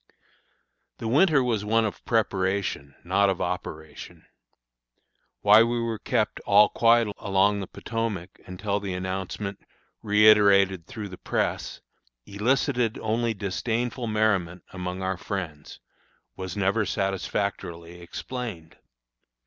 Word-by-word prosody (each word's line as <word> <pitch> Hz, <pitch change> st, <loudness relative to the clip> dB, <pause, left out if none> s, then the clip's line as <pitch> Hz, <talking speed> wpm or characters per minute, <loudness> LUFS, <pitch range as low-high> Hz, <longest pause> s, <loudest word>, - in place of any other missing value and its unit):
The 115 Hz, -, -5 dB
winter 145 Hz, +2 st, +4 dB
was 115 Hz, -4 st, 0 dB
one 115 Hz, +2 st, +2 dB
of 105 Hz, -, -5 dB
preparation, 95 Hz, -, -1 dB
not 95 Hz, +3 st, +2 dB
of 95 Hz, -1 st, -1 dB
operation. 80 Hz, -3 st, -6 dB, 1.2 s
Why 105 Hz, +2 st, +7 dB
we 120 Hz, +1 st, +1 dB
were 115 Hz, -2 st, -2 dB
kept -, -, -1 dB
"all 105 Hz, +1 st, +5 dB
quiet 115 Hz, -1 st, +4 dB
along 100 Hz, +1 st, +2 dB
the 95 Hz, -, -5 dB
Potomac," 110 Hz, -6 st, -4 dB
until 100 Hz, +2 st, -2 dB
the 100 Hz, -2 st, -4 dB
announcement, 95 Hz, +2 st, -4 dB, 0.4 s
reiterated 100 Hz, -3 st, +5 dB
through 110 Hz, -6 st, -7 dB
the 90 Hz, -, -10 dB
press, -, -, -2 dB, 0.4 s
elicited 120 Hz, +2 st, 0 dB
only 115 Hz, +1 st, -1 dB
disdainful 115 Hz, +5 st, -2 dB
merriment 100 Hz, -5 st, 0 dB
among 90 Hz, 0 st, -4 dB
our 95 Hz, 0 st, -1 dB
friends, 85 Hz, -7 st, -6 dB, 0.6 s
was 95 Hz, 0 st, -6 dB
never 100 Hz, +3 st, +2 dB
satisfactorily 90 Hz, -3 st, -3 dB
explained. 90 Hz, -1 st, -7 dB
100 Hz, 110 wpm, -26 LUFS, 95-115 Hz, 1.2 s, Why